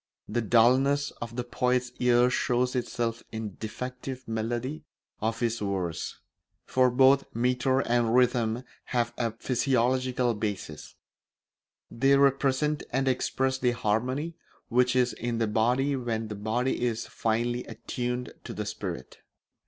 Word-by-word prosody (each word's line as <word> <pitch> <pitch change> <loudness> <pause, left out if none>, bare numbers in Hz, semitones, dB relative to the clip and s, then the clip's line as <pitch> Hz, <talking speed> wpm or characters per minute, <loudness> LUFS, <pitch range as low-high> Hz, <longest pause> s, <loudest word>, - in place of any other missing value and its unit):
The 120 +3 -1
dulness 130 +6 +4
of 115 0 -5
the 125 - -2
poet's 125 0 0
ear 125 0 +4
shows 125 +1 +1
itself 120 -2 -2
in 110 -1 -4
the - - -16
defective 125 +3 -6
melody 120 +7 -3 0.4
of 115 +2 -1
his 115 0 0
verse; 95 -5 -3 0.4
for 130 -1 +3
both 135 +2 +5
metre 125 +2 +2
and 120 -2 +1
rhythm 120 -1 +2 0.2
have 120 -1 0
a 115 -1 0
physiological 125 0 +1
basis; 100 -8 -5 1.0
they 135 +3 +4
represent 140 +2 +2
and 135 +2 0
express 130 +1 0
the 125 -2 +2
harmony 125 +9 -1 0.4
which 125 +1 +3
is 125 -1 +3
in 120 0 -3
the 115 - +2
body 125 +6 +2
when 115 -4 -2
the 105 - -4
body 115 +6 -1
is 120 -2 -1
finely 120 +2 -1
attuned 125 +2 -4
to - - -6
the - - -3
spirit. 65 - -6
120 Hz, 135 wpm, -28 LUFS, 115-130 Hz, 1.0 s, both